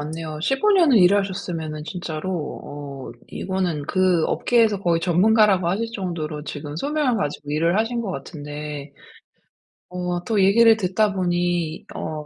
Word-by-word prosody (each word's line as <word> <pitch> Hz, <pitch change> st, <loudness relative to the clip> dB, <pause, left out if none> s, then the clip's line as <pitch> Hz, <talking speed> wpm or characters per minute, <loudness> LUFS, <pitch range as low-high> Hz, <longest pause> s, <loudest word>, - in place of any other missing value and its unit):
않네요. 155 Hz, +1 st, -5 dB
15 270 Hz, -, +2 dB
년을 330 Hz, -, +5 dB
일하셨으면은 180 Hz, -5 st, +1 dB
진짜로 170 Hz, -1 st, -4 dB
어 140 Hz, -2 st, -8 dB, 0.2 s
이거는 185 Hz, -5 st, -2 dB
그 185 Hz, -4 st, +2 dB
업계에서 225 Hz, -5 st, +2 dB
거의 170 Hz, -3 st, +1 dB
전문가라고 190 Hz, +1 st, +3 dB
하실 215 Hz, +6 st, 0 dB
정도로 160 Hz, -7 st, -4 dB
지금 145 Hz, 0 st, -6 dB
소명을 285 Hz, -, 0 dB
가지고 145 Hz, -4 st, -4 dB
일을 165 Hz, +4 st, +1 dB
하신 235 Hz, +2 st, 0 dB
것 210 Hz, -5 st, -3 dB
같은데 145 Hz, -1 st, -7 dB, 1.0 s
어 180 Hz, -1 st, -3 dB
또 210 Hz, -1 st, +1 dB
얘기를 225 Hz, +3 st, +6 dB
듣다 200 Hz, +1 st, +1 dB
보니 175 Hz, -3 st, -1 dB
어 -, -, -4 dB
180 Hz, 300 characters per minute, -22 LUFS, 155-205 Hz, 1.0 s, 얘기를